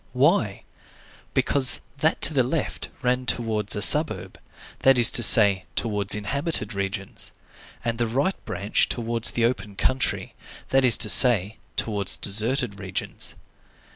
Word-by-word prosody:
Why? 130 - 0 0.7
Because 135 -2 +2 0.2
that 160 +3 -1
to 160 - +4
the 135 - +2
left 130 +4 -4
ran 125 0 -2
towards 110 -3 -1
a 105 - -1
suburb, 150 +5 +3 0.4
that 135 -1 +3
is 120 - +7
to - - +2
say, 100 -4 +5
towards 105 -3 0
inhabited 110 +1 -4
regions, 100 0 -5 0.5
and 115 0 -3
the 120 - -1
right 140 +11 -3
branch 100 +2 -1
towards 115 -1 -1
the 115 - -1
open 110 -4 -4
country, 130 +5 -2 0.4
that 135 0 +1
is 125 -3 +6
to - - -5
say, 110 -4 +3 0.2
towards 100 -2 -2
deserted 110 +1 +1
regions. 95 -2 -5
115 Hz, 140 wpm, -23 LUFS, 105-130 Hz, 0.7 s, is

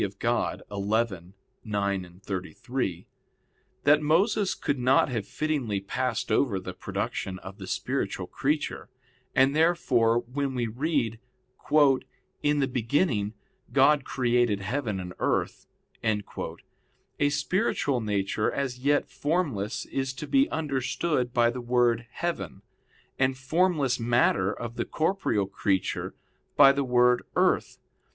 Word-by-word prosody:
Dei - - +2
xi, - - -20
9,33) 100 - -3 0.8
that 150 +1 +5
Moses 190 +7 +2
could 145 -2 -2
not 130 +3 +4
have 115 -5 -3
fittingly 140 -10 -1
passed 125 +6 -2
over 110 -9 +2
the 95 - -7
production 95 -1 -4
of 95 +1 -10
the - - -7
spiritual - - -2
creature, - - -2 0.5
and 135 +2 +4
therefore 135 -9 +3
when 135 +2 -3
we 120 -1 0
read, 120 -1 -1 1.2
"In 145 0 +2
the 135 - +2
beginning 115 - 0 0.4
God 140 +1 +4
created 120 -6 +1
heaven 110 -1 -2
and 90 -1 -6
earth," - - -1 0.4
a 110 +5 -4
spiritual 145 - 0
nature 105 0 0
as 130 -3 -3
yet 145 +3 +2
formless 135 - -1
is 135 -1 -3
to 130 - -6
be 275 +1 +3
understood 140 -2 -1
by 120 -1 +3
the 125 +1 -5
word 120 -1 +2
"heaven," 165 - -4 0.6
and 130 0 +2
formless 145 -2 +1
matter 115 -5 +2
of 120 +1 -6
the - - -1
corporeal 160 - 0
creature 95 -1 -1 0.4
by 135 -1 +9
the 140 0 0
word 125 -1 +4
"earth." - - +2
125 Hz, 115 wpm, -27 LUFS, 105-145 Hz, 1.2 s, by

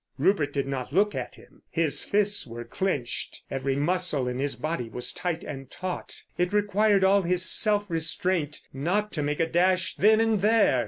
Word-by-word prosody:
Rupert 155 -8 +2
did 140 -1 -1
not 135 -2 -4
look 205 +6 +2
at - - -5
him. - - -19
His 155 -4 +1
fists 205 -5 0
were 120 0 -7
clenched, 130 -1 -3
every 135 0 -1
muscle 145 -3 0
in 125 +1 -3
his 140 +1 -1
body 155 -7 -3
was 120 +3 -3
tight 175 -2 -3
and 135 -3 -7
taut. 185 0 -6 0.2
It 180 0 +1
required 205 -1 +3
all 195 +1 +5
his 180 0 0
self 210 0 +3
restraint 165 -1 -1
not 185 +10 -1
to 155 - -3
make 145 0 -2
a 165 - +3
dash 185 +2 +1
then 215 +2 +5
and 225 -3 +2
there. 215 - +4
175 Hz, 180 wpm, -26 LUFS, 140-200 Hz, 0.2 s, all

